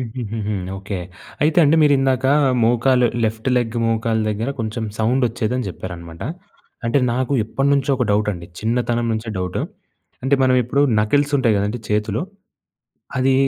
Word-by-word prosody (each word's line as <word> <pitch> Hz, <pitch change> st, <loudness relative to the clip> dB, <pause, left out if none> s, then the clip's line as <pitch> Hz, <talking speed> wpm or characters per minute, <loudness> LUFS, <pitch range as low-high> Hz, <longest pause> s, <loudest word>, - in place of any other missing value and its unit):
హుహుహు. 110 Hz, -3 st, -3 dB, 0.2 s
ఓకే, 100 Hz, 0 st, -5 dB, 0.5 s
అయితే 155 Hz, +2 st, +2 dB
అండి 150 Hz, +2 st, +4 dB
మీరు 145 Hz, -1 st, +5 dB
ఇందాక, 130 Hz, -1 st, +1 dB, 0.4 s
మోకాలు 125 Hz, +2 st, +3 dB, 0.2 s
లెఫ్ట్ 110 Hz, +3 st, -2 dB
లెగ్ 120 Hz, -2 st, 0 dB
మోకాలు 115 Hz, 0 st, 0 dB
దగ్గర 110 Hz, +5 st, -2 dB
కొంచెం 110 Hz, +1 st, -3 dB
సౌండ్ 125 Hz, +4 st, +1 dB
ఒచ్చేదని 125 Hz, +2 st, -2 dB
చెప్పారనమాట. 85 Hz, -2 st, -8 dB, 0.6 s
అంటే, 115 Hz, +4 st, +2 dB
నాకు 130 Hz, +2 st, -1 dB
ఎప్పటినుంచో 140 Hz, +4 st, +1 dB
ఒక 125 Hz, -, +1 dB
డౌట్ 105 Hz, +1 st, +2 dB
అండి. 85 Hz, -2 st, -9 dB
చిన్నతనం 120 Hz, +1 st, 0 dB
నుంచే 110 Hz, +1 st, -4 dB
డౌటు. 90 Hz, 0 st, -2 dB, 0.6 s
అంటే, 135 Hz, +1 st, +3 dB
మనం 130 Hz, -1 st, +4 dB
ఇప్పుడు 130 Hz, +4 st, +1 dB, 0.2 s
నకిల్స్ 145 Hz, +7 st, +1 dB
ఉంటాయి 115 Hz, -5 st, +2 dB
కదండీ! 105 Hz, +4 st, -1 dB
చేతులో 105 Hz, -, 0 dB, 1.0 s
అది 130 Hz, +1 st, +3 dB
115 Hz, 145 wpm, -20 LUFS, 105-130 Hz, 1.0 s, మీరు